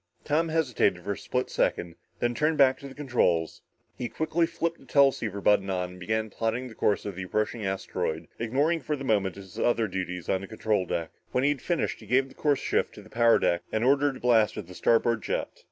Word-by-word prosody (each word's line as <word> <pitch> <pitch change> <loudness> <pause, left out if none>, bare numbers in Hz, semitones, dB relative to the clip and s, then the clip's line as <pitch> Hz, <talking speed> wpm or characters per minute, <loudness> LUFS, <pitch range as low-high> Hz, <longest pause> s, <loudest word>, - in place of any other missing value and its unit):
Tom 160 +3 +1
hesitated 130 - +1
for 100 - -2
a - - -1
split 125 +5 -3
second, 85 -1 0 0.2
then 120 0 0
turned 155 +5 +1
back 130 -2 +5
to 140 - -8
the 135 - -11
controls. 120 - 0 0.3
He 125 -2 -4
quickly 165 +1 0
flipped 170 0 -2
the - - -18
teleceiver 125 -8 +2
button 100 -1 +3
on 90 -1 -2
and 90 - -12
began 110 +3 -2
plotting 115 +4 -2
the - - -11
course 105 -1 0
of 100 -3 -4
the 95 - -5
approaching 105 +4 -2
asteroid, 80 -4 -3
ignoring 140 +9 +1
for 150 +3 -2
the 140 - -7
moment 100 -7 +1
his 95 -2 -10
other 115 -2 +2
duties 90 -2 -4
on 95 - +1
the 95 - -7
control 110 -3 -1
deck. 80 -1 -2 0.2
When 125 - +2
he 145 - +4
had 145 - -4
finished, 175 -2 -1
he 110 - -13
gave 130 +4 +2
the - - -15
course 145 -2 +1
shift - - -1
to - - -11
the - - -17
power 115 0 +5
deck 85 - +1
and 110 - 0
ordered 140 +1 +3
a - - -14
blast 115 -4 +3
on 105 - -5
the 90 - -12
starboard 115 +3 +2
jet. - - -2
115 Hz, 230 wpm, -27 LUFS, 95-135 Hz, 0.3 s, back